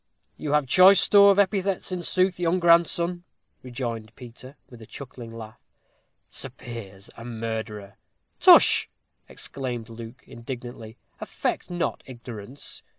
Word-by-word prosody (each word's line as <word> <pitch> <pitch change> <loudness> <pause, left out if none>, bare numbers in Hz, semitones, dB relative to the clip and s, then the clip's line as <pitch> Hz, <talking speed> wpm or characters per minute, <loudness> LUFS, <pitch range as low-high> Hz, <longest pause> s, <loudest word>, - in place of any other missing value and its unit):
"You 150 -1 -4
have 150 -1 +2
choice 185 +7 +6
store 200 -1 +6
of 200 - +4
epithets, 195 -1 0
in 180 -1 -3
sooth, 185 +1 +1
good 175 +1 0
grandson," 170 +1 +2 0.4
rejoined 115 -3 -6
Peter, 125 +3 -13
with 120 -2 -15
a 110 - -12
chuckling 125 -4 -10
laugh. 110 -1 -11 0.7
"Sir - - -5
Piers 100 -5 -11
a 115 - -10
murderer!" 110 -3 -6 0.4
"Tush!" - - +7 0.4
exclaimed 125 -4 -7
Luke, 115 +2 -11
indignantly, 120 -2 -9 0.2
"affect - - -4
not 175 -1 -3
ignorance. 120 0 -8
125 Hz, 125 wpm, -25 LUFS, 115-175 Hz, 0.7 s, Tush